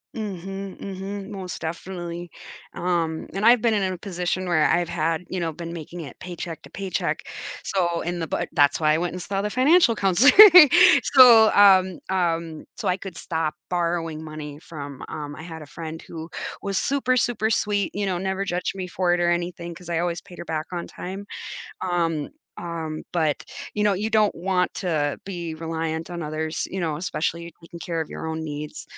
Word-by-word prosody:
Mhm, 195 -2 -5
mhm, 195 +1 -6
most 190 -3 -6
definitely, 175 +1 -5 0.5
um, 170 -2 -1
and 195 - -3
I've 235 +1 +6
been 230 -2 +3
in 195 -3 0
a - - -6
position 185 0 -3
where 170 -4 +2
I've 175 0 +2
had, 165 +1 -1
you 185 - -3
know, 165 -2 -1
been 170 +2 -7
making 170 +1 -7
it 140 -6 -10
paycheck 175 -2 -7
to - - -14
paycheck, 195 -2 -3 0.4
so 175 -3 0
in 175 +1 -3
the 165 - -3
bu - - -1
that's 145 0 +3
why 155 -1 +3
I 155 - +1
went 175 0 -2
and 180 - -5
saw 195 +2 -2
the 210 - -2
financial 260 - +4
counselor. 200 +7 +5 0.8
So, 235 -4 +9
um 190 -3 +6 0.2
um, 165 -3 -1
so - - -3
I 180 - +2
could 190 -3 -9
stop 160 -2 -2 0.2
borrowing 170 -3 -1
money 150 -2 -8
from, 145 -4 -8
um, 145 -1 -6
I - - -9
had 160 -1 -8
a - - -11
friend 160 +2 -7
who 160 0 -8 0.3
was 200 -1 -2
super, 260 0 +1
super 220 -3 +1
sweet, 205 -3 +1
you 205 0 -1
know, 185 -2 -1
never 190 +1 -2
judged 180 0 -2
me 190 -1 -4
for 175 0 +1
it - - -2
or 175 0 +2
anything 175 0 -3
'cause 175 +1 -12
I 170 - 0
always 170 0 -1
paid 175 - -14
her - - -7
back 155 -1 -3
on 175 -1 -4
time. 195 +3 -7 0.6
Um 165 -4 -1 0.3
um, 160 -2 -5
but, 160 -4 0 0.3
you 210 - 0
know, 205 - +4
you 210 +3 -2
don't 215 -2 +3
want 180 +1 0
to 155 -6 -1
be 175 -4 -5
reliant 160 0 -4
on 170 -2 -5
others, 155 +1 -3
you 190 - -4
know, 160 -3 -1
especially 170 0 -3
taking 170 +1 -11
care 170 -1 -3
of 160 - -4
your - - -6
own 160 0 -3
needs. 150 -1 -6
175 Hz, 195 wpm, -24 LUFS, 160-190 Hz, 0.8 s, So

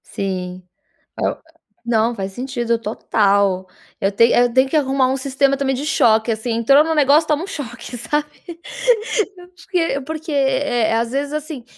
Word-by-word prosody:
Sim, 185 -2 -5 0.6
oh - - 0 0.5
Não, 235 0 +1
faz 195 -3 -5
sentido 240 0 -2
total. 200 -3 +1 0.3
Eu 195 +1 +1
tenho 235 +3 +4
tenho 260 +1 +4
que 310 - -1
arrumar 270 -3 +2
um 265 - 0
sistema 275 +1 +1
também 270 -1 -1
de 265 +3 -4
choque 235 -7 +3
assim, 225 +2 -2
entrou 275 +6 +4
no 320 0 -1
negócio, 300 +1 +4
toma 300 +1 +1
um - - -6
choque, 290 - -7
sabe? 295 +6 -1 1.1
É 355 - -12
porque 335 -5 -1
porque, 320 +1 -5
eh, 270 -5 +1
às 230 +1 0
vezes 280 +2 -2
assim, 300 -4 -5
260 Hz, 160 wpm, -19 LUFS, 225-290 Hz, 1.1 s, tenho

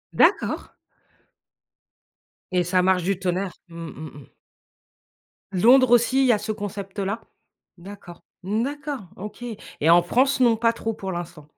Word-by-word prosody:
D'accord. - - +2 1.8
Et 180 -1 +2
ça 180 +1 +2
marche 185 -1 +2
du 195 0 0
tonnerre? 185 0 -2 0.2
Mmh, 165 - -11
mmh 155 -1 -9
mh. - - -15 1.3
Londres 245 +6 +5
aussi, 245 +3 +4
il - - +4
y - - +6
a - - +2
ce 215 +1 -4
concept-là? 200 0 -4 0.6
D'accord, 180 -1 -12 0.2
mmh, 215 +5 0
d'accord, 285 -2 -4 0.2
OK 210 +4 -8
et 215 -8 -4
en 175 +1 +7
France, 260 +9 +2
non, 240 -3 +5
pas 230 0 +2
trop 225 -1 -3
pour 190 -2 -6
l'instant? 170 -3 -7
200 Hz, 145 wpm, -24 LUFS, 180-235 Hz, 1.8 s, en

